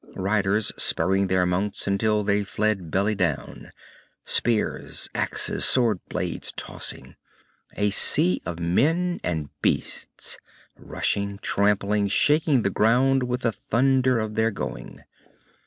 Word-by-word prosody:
Riders, 100 Hz, +2 st, 0 dB
spurring 95 Hz, +4 st, +1 dB
their 95 Hz, -1 st, +1 dB
mounts 95 Hz, +3 st, -2 dB
until 105 Hz, +2 st, 0 dB
they 100 Hz, 0 st, +1 dB
fled 100 Hz, -3 st, -2 dB
belly 100 Hz, +6 st, 0 dB
down. 90 Hz, -7 st, -3 dB, 0.5 s
Spears, 115 Hz, -2 st, 0 dB
axes, -, -, 0 dB
sword 115 Hz, -7 st, +3 dB
blades -, -, -4 dB
tossing, -, -, -5 dB, 0.6 s
a 105 Hz, 0 st, +1 dB
sea 90 Hz, -2 st, +5 dB
of 85 Hz, -1 st, -6 dB
men 165 Hz, -, 0 dB
and 80 Hz, -5 st, -3 dB
beasts, -, -, -2 dB, 0.4 s
rushing, 100 Hz, 0 st, -2 dB
trampling, 100 Hz, 0 st, +1 dB
shaking 145 Hz, +3 st, +2 dB
the 100 Hz, -, 0 dB
ground 130 Hz, +6 st, +2 dB
with 125 Hz, +1 st, -3 dB
the 115 Hz, -, 0 dB
thunder 130 Hz, +3 st, +1 dB
of 110 Hz, -1 st, -3 dB
their 110 Hz, +1 st, +1 dB
going. 105 Hz, -, -7 dB
105 Hz, 120 wpm, -24 LUFS, 95-115 Hz, 0.6 s, sea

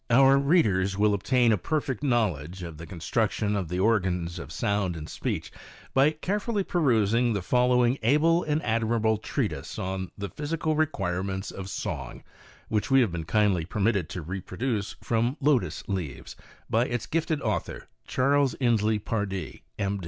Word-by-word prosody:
Our 135 Hz, +3 st, +6 dB
readers 100 Hz, -, +2 dB
will 105 Hz, 0 st, +3 dB
obtain 120 Hz, +4 st, +3 dB
a 105 Hz, -, +2 dB
perfect 140 Hz, -, -2 dB
knowledge 95 Hz, -, 0 dB
of 80 Hz, -3 st, -8 dB
the 85 Hz, -, -8 dB
construc 100 Hz, +6 st, 0 dB
tion 105 Hz, -1 st, -1 dB
of 95 Hz, -4 st, -2 dB
the 90 Hz, +1 st, -2 dB
organs 90 Hz, -5 st, +1 dB
of 70 Hz, -1 st, -8 dB
sound 100 Hz, -3 st, 0 dB
and 80 Hz, -1 st, -7 dB
speech -, -, -4 dB, 0.4 s
by 135 Hz, +2 st, +5 dB
carefully 205 Hz, +7 st, -2 dB
perusing 120 Hz, -, +2 dB
the 100 Hz, -3 st, -2 dB
following 125 Hz, +3 st, +3 dB
able 155 Hz, +8 st, +4 dB
and 150 Hz, +1 st, -1 dB
admirable 110 Hz, -1 st, +1 dB
treatise -, -, -3 dB
on 95 Hz, 0 st, -3 dB
" -, -, -46 dB
The 100 Hz, -1 st, -4 dB
Physical 155 Hz, +1 st, -2 dB
Requirements 95 Hz, -, -1 dB
of 95 Hz, 0 st, -7 dB
Song" -, -, -5 dB, 0.4 s
which 105 Hz, +3 st, -1 dB
we 135 Hz, 0 st, +6 dB
have 115 Hz, -7 st, +1 dB
been 85 Hz, -2 st, -4 dB
kindly 95 Hz, -1 st, +2 dB
permitted 100 Hz, 0 st, 0 dB
to 90 Hz, -, -5 dB
reproduce 100 Hz, -, -3 dB
from 120 Hz, +4 st, 0 dB
Lotus 140 Hz, -4 st, +1 dB
Leaves, 90 Hz, -8 st, -4 dB, 0.3 s
by 115 Hz, +3 st, +2 dB
its 120 Hz, -2 st, -2 dB
gifted 160 Hz, -1 st, -1 dB
author, -, -, -3 dB, 0.2 s
Charles 140 Hz, 0 st, +2 dB
Inslee 110 Hz, -4 st, +2 dB
Pardee, 100 Hz, -4 st, -3 dB, 0.2 s
M. 100 Hz, 0 st, -1 dB
110 Hz, 160 wpm, -27 LUFS, 95-135 Hz, 0.4 s, Our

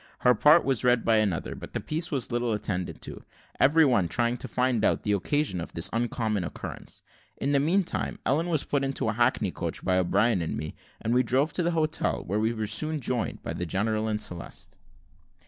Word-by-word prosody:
Her 125 Hz, -, +5 dB
part 150 Hz, +9 st, +5 dB
was 135 Hz, -4 st, +1 dB
read 125 Hz, -2 st, +3 dB
by 115 Hz, -1 st, +4 dB
another, 100 Hz, -6 st, 0 dB
but -, -, -10 dB
the -, -, -1 dB
piece 160 Hz, +3 st, -3 dB
was 135 Hz, -5 st, -1 dB
little 120 Hz, -1 st, 0 dB
attended 95 Hz, -4 st, -3 dB
to, -, -, -7 dB, 0.4 s
every 155 Hz, +4 st, +5 dB
one 100 Hz, -10 st, +3 dB
trying 120 Hz, +6 st, +1 dB
to 130 Hz, -, -7 dB
find 125 Hz, -1 st, 0 dB
out -, -, +2 dB
the 105 Hz, -, 0 dB
occasion 105 Hz, -, 0 dB
of -, -, -8 dB
this 85 Hz, -, 0 dB
uncommon 115 Hz, -3 st, -1 dB
occurrence. 85 Hz, -, -7 dB, 0.3 s
In 140 Hz, -, -1 dB
the 140 Hz, -, +4 dB
meantime, 175 Hz, +6 st, 0 dB
Ellen 155 Hz, +6 st, +1 dB
was 155 Hz, -4 st, +1 dB
put 140 Hz, -1 st, -1 dB
into 135 Hz, -4 st, -1 dB
a -, -, 0 dB
hackney 120 Hz, -4 st, +1 dB
coach 85 Hz, -2 st, -4 dB
by 95 Hz, 0 st, +3 dB
O'Brien 95 Hz, +3 st, +2 dB
and 80 Hz, -, -3 dB
me, 75 Hz, +1 st, -5 dB, 0.3 s
and 115 Hz, -, -1 dB
we 125 Hz, -, +5 dB
drove 130 Hz, +5 st, +1 dB
to -, -, 0 dB
the 170 Hz, -, +1 dB
hotel, 155 Hz, -1 st, 0 dB
where 100 Hz, +5 st, -1 dB
we 110 Hz, +1 st, +1 dB
were 110 Hz, -2 st, -3 dB
soon 155 Hz, +8 st, 0 dB
joined 125 Hz, -2 st, -2 dB
by -, -, -4 dB
the 90 Hz, -, -4 dB
general 110 Hz, +4 st, 0 dB
and 105 Hz, -1 st, -1 dB
Celeste. 90 Hz, -5 st, -5 dB
120 Hz, 215 wpm, -27 LUFS, 105-140 Hz, 0.4 s, Her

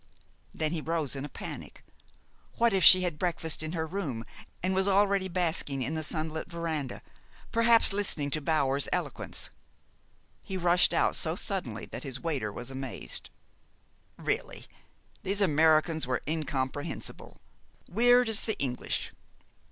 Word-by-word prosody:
Then 155 Hz, -1 st, -1 dB
he 165 Hz, -2 st, -2 dB
rose 160 Hz, -3 st, -1 dB
in 135 Hz, +1 st, -4 dB
a -, -, -8 dB
panic. -, -, -9 dB, 0.7 s
What 235 Hz, -2 st, +3 dB
if 190 Hz, -, +2 dB
she 185 Hz, 0 st, +10 dB
had 170 Hz, -4 st, -2 dB
breakfasted 165 Hz, -3 st, 0 dB
in -, -, -5 dB
her 160 Hz, -2 st, -1 dB
room, 155 Hz, -, -4 dB, 0.4 s
and 185 Hz, +1 st, +1 dB
was 190 Hz, +1 st, +2 dB
already 200 Hz, -1 st, +3 dB
basking 165 Hz, -7 st, -1 dB
in 135 Hz, +6 st, -2 dB
the 160 Hz, -, -2 dB
sunlit 155 Hz, 0 st, -3 dB
veranda 160 Hz, -6 st, -4 dB, 0.5 s
perhaps 230 Hz, -2 st, +5 dB
listening 165 Hz, -8 st, +1 dB
to 155 Hz, -, -1 dB
Bower's 140 Hz, -2 st, +2 dB
eloquence? -, -, -3 dB, 0.9 s
He 190 Hz, -, -5 dB
rushed 175 Hz, 0 st, +4 dB
out -, -, +2 dB
so 160 Hz, 0 st, +2 dB
suddenly 175 Hz, -, -4 dB
that -, -, -8 dB
his 130 Hz, -3 st, -5 dB
waiter 140 Hz, -11 st, -2 dB
was 120 Hz, +5 st, -7 dB
amazed. 135 Hz, -1 st, -5 dB, 0.9 s
Really, -, -, -3 dB, 0.6 s
these 200 Hz, +2 st, -1 dB
Americans 160 Hz, -3 st, +3 dB
were 125 Hz, -, -1 dB
incomprehensible 145 Hz, -3 st, -4 dB, 0.5 s
weird 245 Hz, +4 st, +4 dB
as 220 Hz, -2 st, +1 dB
the 220 Hz, -, -3 dB
English. 125 Hz, -3 st, -2 dB
160 Hz, 140 wpm, -29 LUFS, 145-190 Hz, 0.9 s, she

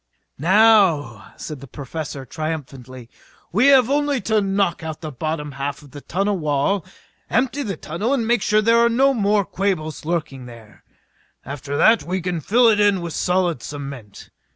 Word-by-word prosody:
"Now," 170 Hz, -, +3 dB
said 150 Hz, -3 st, -7 dB
the 140 Hz, -, -11 dB
Professor 140 Hz, +1 st, -7 dB
triumphantly, 130 Hz, -5 st, -6 dB, 0.4 s
"we 225 Hz, +9 st, +3 dB
have 265 Hz, -4 st, +6 dB
only 290 Hz, 0 st, +1 dB
to 215 Hz, +1 st, +1 dB
knock 195 Hz, -2 st, 0 dB
out 160 Hz, -1 st, -6 dB
the 155 Hz, -2 st, -6 dB
bottom 150 Hz, +2 st, -4 dB
half 140 Hz, +2 st, -5 dB
of 140 Hz, -, -16 dB
the 145 Hz, -, -10 dB
tunnel 195 Hz, +4 st, -1 dB
wall, 150 Hz, +5 st, 0 dB, 0.5 s
empty 260 Hz, +4 st, 0 dB
the 200 Hz, -, -4 dB
tunnel 180 Hz, -, -3 dB
and 260 Hz, -5 st, +1 dB
make 235 Hz, -1 st, +2 dB
sure 215 Hz, +1 st, +2 dB
there 230 Hz, +1 st, +4 dB
are 235 Hz, -, +4 dB
no 270 Hz, +4 st, +3 dB
more 205 Hz, -3 st, +1 dB
Quabos 180 Hz, -6 st, -3 dB
lurking 155 Hz, -6 st, -3 dB
there. 115 Hz, -3 st, -15 dB, 0.6 s
After 140 Hz, +1 st, -5 dB
that 225 Hz, +8 st, +5 dB
we 185 Hz, +2 st, -3 dB
can 175 Hz, -2 st, -3 dB
fill 235 Hz, -, +3 dB
it 215 Hz, -2 st, +4 dB
in 205 Hz, -3 st, +3 dB
with 170 Hz, -2 st, -5 dB
solid 180 Hz, -6 st, 0 dB
cement. 140 Hz, -8 st, -9 dB
170 Hz, 170 wpm, -21 LUFS, 145-210 Hz, 0.6 s, have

